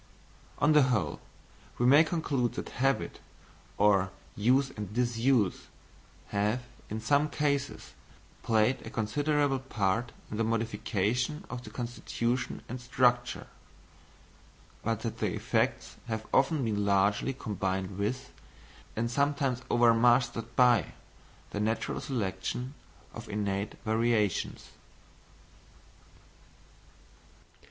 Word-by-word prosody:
On 150 Hz, -, +3 dB
the 150 Hz, -1 st, +7 dB
whole, 120 Hz, -, 0 dB, 0.6 s
we 120 Hz, -, +1 dB
may 145 Hz, +5 st, +8 dB
conclude 150 Hz, -7 st, -1 dB
that -, -, -5 dB
habit, 135 Hz, +1 st, 0 dB, 0.6 s
or 100 Hz, -2 st, +4 dB, 0.3 s
use 130 Hz, +6 st, +3 dB
and 105 Hz, -5 st, -6 dB
disuse, 120 Hz, -2 st, +1 dB, 0.6 s
have, 105 Hz, +5 st, 0 dB, 0.3 s
in 110 Hz, -, -3 dB
some 145 Hz, +6 st, +2 dB
cases, 140 Hz, -2 st, -1 dB, 0.5 s
played 115 Hz, +3 st, +2 dB
a -, -, -7 dB
considerable 145 Hz, +5 st, +1 dB
part 120 Hz, -2 st, -1 dB, 0.2 s
in 105 Hz, -, -3 dB
the 115 Hz, -, +1 dB
modification 115 Hz, -, -1 dB
of 125 Hz, -1 st, -5 dB
the -, -, -9 dB
constitution 120 Hz, 0 st, -3 dB
and 125 Hz, +1 st, -6 dB
structure; 120 Hz, -1 st, +1 dB, 1.4 s
but 115 Hz, -1 st, -1 dB
that 115 Hz, -1 st, -4 dB
the -, -, 0 dB
effects -, -, -1 dB
have 110 Hz, -1 st, -3 dB
often 135 Hz, 0 st, +3 dB
been 105 Hz, -2 st, 0 dB
largely 100 Hz, +5 st, +2 dB
combined 95 Hz, -5 st, -3 dB
with, 130 Hz, +6 st, -2 dB, 0.6 s
and 115 Hz, +1 st, -1 dB
sometimes 140 Hz, -2 st, +1 dB
overmastered 120 Hz, 0 st, +3 dB
by, 120 Hz, -7 st, +4 dB, 0.6 s
the 105 Hz, -, -3 dB
natural 110 Hz, +2 st, -1 dB
selection 120 Hz, +1 st, -3 dB, 0.4 s
of -, -, -9 dB
innate 100 Hz, 0 st, -2 dB
variations. 110 Hz, -3 st, 0 dB
120 Hz, 105 wpm, -30 LUFS, 105-130 Hz, 1.4 s, may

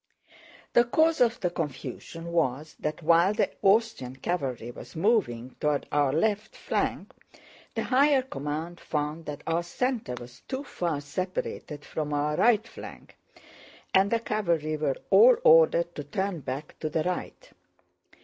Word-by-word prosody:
The 240 Hz, -, +6 dB
cause 315 Hz, +4 st, +2 dB
of 245 Hz, 0 st, +3 dB
the 180 Hz, -3 st, 0 dB
confusion 165 Hz, +2 st, -5 dB
was 155 Hz, -2 st, -1 dB
that 150 Hz, +2 st, -3 dB
while 170 Hz, +5 st, +4 dB
the -, -, +1 dB
Austrian 200 Hz, -, +2 dB
cavalry 130 Hz, -6 st, -3 dB
was -, -, -12 dB
moving 160 Hz, -, +1 dB
toward 150 Hz, -1 st, 0 dB
our 145 Hz, -2 st, +2 dB
left 210 Hz, +7 st, 0 dB
flank, -, -, -2 dB, 0.6 s
the -, -, -1 dB
higher 275 Hz, +1 st, +4 dB
command 160 Hz, -, -5 dB
found 150 Hz, +2 st, -3 dB
that 150 Hz, 0 st, -6 dB
our 165 Hz, +1 st, +1 dB
center 220 Hz, -, -2 dB
was 120 Hz, +1 st, -12 dB
too 265 Hz, +1 st, -3 dB
far 170 Hz, -, -2 dB
separated 150 Hz, -1 st, -4 dB
from 150 Hz, -1 st, -3 dB
our 150 Hz, +1 st, 0 dB
right 225 Hz, +3 st, +3 dB
flank -, -, -11 dB, 0.8 s
and 190 Hz, +1 st, +5 dB
the 230 Hz, -, +2 dB
cavalry 170 Hz, -9 st, -1 dB
were 150 Hz, -3 st, -1 dB
all 485 Hz, +1 st, +8 dB
ordered -, -, +5 dB
to -, -, -6 dB
turn 195 Hz, -4 st, -2 dB
back 135 Hz, +2 st, -6 dB
to 155 Hz, -, -2 dB
the 155 Hz, 0 st, 0 dB
right. 180 Hz, -, -4 dB
170 Hz, 145 wpm, -27 LUFS, 150-225 Hz, 0.8 s, all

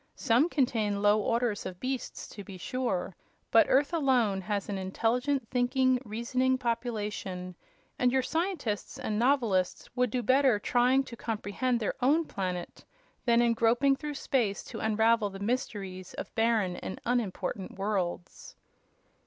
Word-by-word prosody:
Some 245 Hz, +9 st, +3 dB
contain 220 Hz, -9 st, 0 dB
low 210 Hz, +1 st, +5 dB
orders 230 Hz, -1 st, 0 dB
of 180 Hz, -1 st, -7 dB
beasts, 260 Hz, 0 st, -4 dB
to 205 Hz, -, -9 dB
be 195 Hz, -2 st, -9 dB
sure, 195 Hz, -3 st, -2 dB, 0.4 s
but 225 Hz, -, +6 dB
Earth 280 Hz, +5 st, +3 dB
alone 250 Hz, -, +2 dB
has 205 Hz, +1 st, -2 dB
an 200 Hz, -2 st, -3 dB
intelligent, 235 Hz, +7 st, 0 dB
thinking, 255 Hz, 0 st, +2 dB
reasoning 255 Hz, +4 st, 0 dB
population, 210 Hz, -6 st, -3 dB, 0.5 s
and 250 Hz, 0 st, +3 dB
your 260 Hz, 0 st, +2 dB
scientists 320 Hz, -, -2 dB
and 210 Hz, 0 st, -2 dB
novelists 230 Hz, -8 st, +1 dB
would 250 Hz, -1 st, +2 dB
do 245 Hz, +2 st, -2 dB
better 260 Hz, 0 st, +4 dB
trying 250 Hz, +5 st, +3 dB
to 240 Hz, -, -9 dB
comprehend 230 Hz, +2 st, -2 dB
their 215 Hz, -, -1 dB
own 300 Hz, +6 st, +3 dB
planet 180 Hz, -6 st, -4 dB, 0.4 s
than 235 Hz, -1 st, +4 dB
in 235 Hz, -1 st, +3 dB
groping 240 Hz, +5 st, +3 dB
through 295 Hz, +1 st, -5 dB
space 235 Hz, -8 st, 0 dB
to -, -, -8 dB
unravel 220 Hz, 0 st, +2 dB
the 195 Hz, -, -9 dB
mysteries 200 Hz, -5 st, -3 dB
of -, -, -7 dB
barren 225 Hz, -6 st, +1 dB
and -, -, -6 dB
unimportant 220 Hz, -4 st, -2 dB
worlds." 190 Hz, -3 st, -3 dB
230 Hz, 145 wpm, -29 LUFS, 205-255 Hz, 0.5 s, but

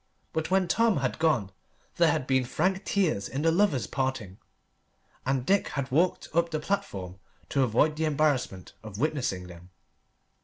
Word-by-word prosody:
But 160 Hz, 0 st, -2 dB
when 190 Hz, -1 st, +2 dB
Tom 225 Hz, +1 st, +3 dB
had 130 Hz, +1 st, -2 dB
gone 120 Hz, -12 st, +1 dB, 0.5 s
there -, -, +5 dB
had -, -, -1 dB
been 130 Hz, -1 st, +2 dB
frank 185 Hz, +10 st, -1 dB
tears 160 Hz, -, 0 dB
in 135 Hz, +4 st, -3 dB
the 165 Hz, -, +4 dB
lovers' 165 Hz, -, +2 dB
parting, 130 Hz, -8 st, -3 dB, 0.9 s
and 135 Hz, -2 st, 0 dB
Dick 200 Hz, +5 st, +2 dB
had 140 Hz, -2 st, -4 dB
walked 170 Hz, +7 st, +1 dB
up 170 Hz, +1 st, +2 dB
the 155 Hz, -2 st, -2 dB
platform 95 Hz, -, -3 dB, 0.3 s
to 140 Hz, -, +1 dB
avoid 135 Hz, +5 st, +2 dB
the 160 Hz, -, 0 dB
embarrassment 145 Hz, -11 st, 0 dB
of 110 Hz, -2 st, -9 dB
witnessing 125 Hz, -9 st, -1 dB
them. 90 Hz, 0 st, -13 dB
140 Hz, 160 wpm, -28 LUFS, 115-165 Hz, 0.9 s, there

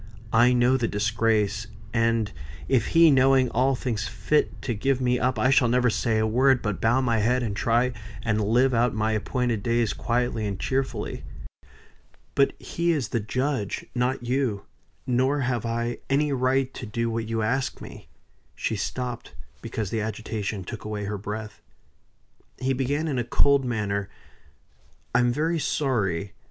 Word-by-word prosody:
I 120 Hz, +2 st, +6 dB
know 125 Hz, +1 st, +3 dB
the 120 Hz, -3 st, 0 dB
disgrace; 110 Hz, 0 st, 0 dB, 0.3 s
and 115 Hz, -2 st, +1 dB, 0.4 s
if 125 Hz, -5 st, +2 dB
he, 165 Hz, -2 st, +8 dB
knowing 130 Hz, -1 st, +4 dB
all, 130 Hz, +3 st, +2 dB
thinks 115 Hz, -4 st, -2 dB
fit 150 Hz, 0 st, 0 dB
to 120 Hz, -, -1 dB
give 135 Hz, +5 st, 0 dB
me 125 Hz, -1 st, +1 dB
up, 125 Hz, -1 st, 0 dB
I 130 Hz, +5 st, +3 dB
shall 130 Hz, -2 st, +5 dB
never 125 Hz, 0 st, +3 dB
say 110 Hz, 0 st, 0 dB
a 110 Hz, -, +2 dB
word, 130 Hz, +3 st, +3 dB
but 105 Hz, -3 st, -2 dB
bow 120 Hz, +4 st, +3 dB
my 115 Hz, -3 st, +1 dB
head, 125 Hz, +4 st, +2 dB
and 105 Hz, -3 st, -2 dB
try 120 Hz, +4 st, +1 dB, 0.3 s
and 110 Hz, -2 st, +1 dB
live 125 Hz, +5 st, +3 dB
out 120 Hz, 0 st, +2 dB
my 110 Hz, 0 st, +1 dB
appointed 115 Hz, +1 st, -1 dB
days 115 Hz, -1 st, +1 dB
quietly 120 Hz, -2 st, -1 dB
and 100 Hz, -2 st, -4 dB
cheerfully. 135 Hz, 0 st, -2 dB, 1.1 s
But 140 Hz, -, +3 dB
he 170 Hz, 0 st, -1 dB
is 145 Hz, -8 st, -1 dB
the 115 Hz, -, 0 dB
judge, 125 Hz, 0 st, -2 dB
not 125 Hz, 0 st, -1 dB
you; 120 Hz, -6 st, -1 dB, 0.4 s
nor 130 Hz, +3 st, +1 dB
have 120 Hz, -3 st, -1 dB
I 115 Hz, +1 st, -2 dB
any 145 Hz, +1 st, +2 dB
right 130 Hz, 0 st, +1 dB
to -, -, -7 dB
do 115 Hz, +2 st, -2 dB
what 115 Hz, -1 st, -3 dB
you 115 Hz, -1 st, -1 dB
ask 130 Hz, +4 st, -1 dB
me." -, -, -11 dB, 0.5 s
She 110 Hz, -, -2 dB
stopped, 125 Hz, +4 st, -4 dB, 0.3 s
because 110 Hz, -4 st, -4 dB
the 115 Hz, -, -1 dB
agitation 105 Hz, -2 st, -4 dB
took -, -, -7 dB
away 105 Hz, -1 st, -4 dB
her 105 Hz, +1 st, -3 dB
breath. 105 Hz, +1 st, -6 dB, 1.0 s
He 130 Hz, +1 st, 0 dB
began 140 Hz, +5 st, -1 dB
in 135 Hz, -5 st, -1 dB
a -, -, 0 dB
cold 135 Hz, +3 st, +3 dB
manner: 100 Hz, -4 st, -2 dB, 1.0 s
"I 120 Hz, -, +4 dB
am 120 Hz, 0 st, +3 dB
very 160 Hz, +6 st, 0 dB
sorry. 105 Hz, -, -1 dB
120 Hz, 165 wpm, -25 LUFS, 110-130 Hz, 1.1 s, he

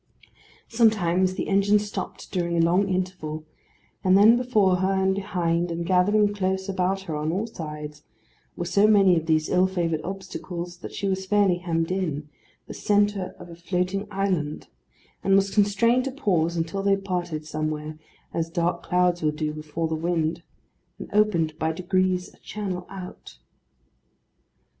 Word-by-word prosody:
Sometimes 190 Hz, -5 st, +2 dB
the -, -, -3 dB
engine 200 Hz, +1 st, +4 dB
stopped 210 Hz, 0 st, -5 dB
during 170 Hz, -2 st, -1 dB
a 165 Hz, -, +4 dB
long 185 Hz, +4 st, +2 dB
interval, 180 Hz, -4 st, -3 dB, 0.6 s
and 185 Hz, 0 st, +5 dB
then 215 Hz, +4 st, +7 dB
before 215 Hz, -7 st, +2 dB
her 190 Hz, +1 st, +1 dB
and 190 Hz, 0 st, +2 dB
behind, 175 Hz, -3 st, -1 dB
and 170 Hz, 0 st, -3 dB
gathering 205 Hz, +4 st, +3 dB
close 190 Hz, -1 st, -1 dB
about 190 Hz, 0 st, 0 dB
her 165 Hz, -5 st, -5 dB
on 150 Hz, +1 st, -1 dB
all 195 Hz, +6 st, -1 dB
sides, 150 Hz, -7 st, -7 dB, 0.5 s
were 175 Hz, -, -3 dB
so 200 Hz, +4 st, +4 dB
many 195 Hz, -4 st, +5 dB
of 165 Hz, -1 st, -2 dB
these 155 Hz, -1 st, +2 dB
ill 185 Hz, +1 st, +3 dB
favoured 170 Hz, -4 st, -1 dB
obstacles 180 Hz, -2 st, -6 dB
that -, -, -8 dB
she 200 Hz, -, -3 dB
was 190 Hz, 0 st, -2 dB
fairly 200 Hz, -3 st, +3 dB
hemmed 165 Hz, -1 st, -1 dB
in; 160 Hz, -6 st, -2 dB, 0.4 s
the -, -, -8 dB
centre 205 Hz, -2 st, +1 dB
of -, -, -11 dB
a -, -, -9 dB
floating 180 Hz, +3 st, -2 dB
island; 190 Hz, -7 st, -2 dB, 0.5 s
and 195 Hz, -, +4 dB
was 195 Hz, 0 st, +2 dB
constrained 225 Hz, +5 st, +3 dB
to 270 Hz, -, -2 dB
pause 175 Hz, -, 0 dB
until 165 Hz, +4 st, -2 dB
they 195 Hz, 0 st, +3 dB
parted, 175 Hz, -5 st, -3 dB
somewhere, 155 Hz, 0 st, -4 dB, 0.3 s
as 165 Hz, 0 st, -1 dB
dark 170 Hz, +1 st, -1 dB
clouds 180 Hz, -1 st, +1 dB
will 155 Hz, -, +2 dB
do 150 Hz, 0 st, -3 dB
before 155 Hz, +2 st, -3 dB
the 160 Hz, -, -3 dB
wind, 165 Hz, 0 st, -1 dB, 0.6 s
and -, -, -9 dB
opened 190 Hz, -7 st, +2 dB
by 160 Hz, 0 st, +1 dB
degrees 185 Hz, +2 st, 0 dB
a -, -, -22 dB
channel 190 Hz, -4 st, -5 dB
out. 185 Hz, -, -9 dB
180 Hz, 160 wpm, -25 LUFS, 165-195 Hz, 0.6 s, then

